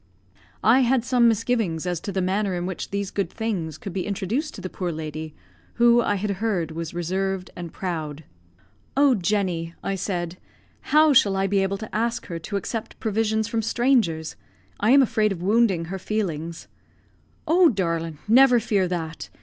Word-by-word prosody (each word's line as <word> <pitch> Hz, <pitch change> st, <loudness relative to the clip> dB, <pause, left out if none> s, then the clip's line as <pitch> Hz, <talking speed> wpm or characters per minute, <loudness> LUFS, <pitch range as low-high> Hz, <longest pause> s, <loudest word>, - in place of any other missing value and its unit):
I 235 Hz, +4 st, +6 dB
had 250 Hz, -1 st, +2 dB
some 245 Hz, -2 st, +4 dB
misgivings 225 Hz, -7 st, 0 dB
as 175 Hz, -2 st, -1 dB
to 200 Hz, -, -5 dB
the 190 Hz, -1 st, -1 dB
manner 190 Hz, +1 st, 0 dB
in 175 Hz, 0 st, -3 dB
which 185 Hz, -1 st, -5 dB
these 200 Hz, -1 st, -3 dB
good 200 Hz, -, -1 dB
things 185 Hz, -9 st, -3 dB
could 195 Hz, 0 st, -7 dB
be 185 Hz, -1 st, -3 dB
introduced 215 Hz, -, -2 dB
to -, -, -8 dB
the 185 Hz, -, -4 dB
poor 180 Hz, -1 st, -4 dB
lady, 155 Hz, 0 st, -6 dB, 0.4 s
who, 240 Hz, 0 st, +5 dB
I 205 Hz, -, 0 dB
had 200 Hz, +1 st, -2 dB
heard, 185 Hz, -8 st, 0 dB
was 165 Hz, 0 st, -6 dB
reserved 185 Hz, +2 st, -2 dB
and 170 Hz, -2 st, -7 dB
proud. 160 Hz, -5 st, -4 dB, 0.7 s
"Oh, 280 Hz, -1 st, +5 dB
Jenny," 180 Hz, -5 st, -1 dB
I 195 Hz, -, -1 dB
said, 180 Hz, -2 st, -3 dB, 0.6 s
"how 305 Hz, -1 st, +6 dB
shall 200 Hz, -6 st, +5 dB
I 195 Hz, 0 st, +1 dB
be 195 Hz, 0 st, +2 dB
able 195 Hz, +1 st, -1 dB
to 215 Hz, +1 st, -8 dB
ask 235 Hz, +2 st, -1 dB
her 170 Hz, -1 st, -5 dB
to 185 Hz, +5 st, -4 dB
accept 215 Hz, +3 st, -5 dB
provisions 220 Hz, 0 st, 0 dB
from 225 Hz, 0 st, -1 dB
strangers? 225 Hz, -9 st, +1 dB, 0.4 s
I 210 Hz, -, +2 dB
am 275 Hz, +2 st, +7 dB
afraid 215 Hz, -3 st, +1 dB
of 175 Hz, -3 st, -4 dB
wounding 200 Hz, -4 st, +2 dB
her 190 Hz, +3 st, -5 dB
feelings." 170 Hz, -6 st, -3 dB, 0.8 s
"Oh, 340 Hz, +2 st, +6 dB
darlint, 165 Hz, -, -2 dB
never 245 Hz, +2 st, +6 dB
fear 210 Hz, -5 st, +1 dB
that! 165 Hz, -2 st, -4 dB
195 Hz, 175 wpm, -24 LUFS, 175-225 Hz, 0.8 s, am